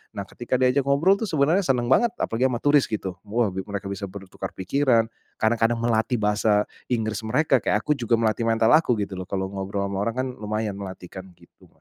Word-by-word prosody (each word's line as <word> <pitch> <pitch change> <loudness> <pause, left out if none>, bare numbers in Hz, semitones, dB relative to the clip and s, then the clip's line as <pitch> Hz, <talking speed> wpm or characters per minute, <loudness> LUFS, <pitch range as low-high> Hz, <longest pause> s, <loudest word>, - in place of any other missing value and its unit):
Nah, 100 - -3
ketika 120 +5 -3
diajak 130 +2 +2
ngobrol 165 +8 +3
tuh 220 - -1
sebenarnya 155 +5 +2
senang 125 -1 +1
banget, 235 - +4
apalagi 125 +4 0
sama 120 -1 -2
turis 145 -1 +4
gitu. 95 -4 -4
Wah, 110 -1 +1
mereka 100 +1 -5
bisa 100 0 -4
bertukar 95 0 -8
pikiran, 115 +2 +2 0.3
kadang-kadang 115 +1 +1
melatih 115 +1 +1
bahasa 105 0 +2 0.3
Inggris 110 -2 -1
mereka, 135 +1 +2
kayak 105 - +1
aku 150 - -1
juga 120 -2 +1
melatih 115 +1 +1
mental 115 0 +3
aku 155 -7 +4
gitu 95 -1 -6
loh, 90 - -6
kalau 95 -1 -2
ngobrol 100 0 -3
sama 100 0 -3
orang 115 - -2
kan - - -3
lumayan 105 -1 -3
melatih 95 -2 -8
kan 95 0 -9
gitu. - - -22
115 Hz, 200 wpm, -24 LUFS, 100-130 Hz, 0.3 s, banget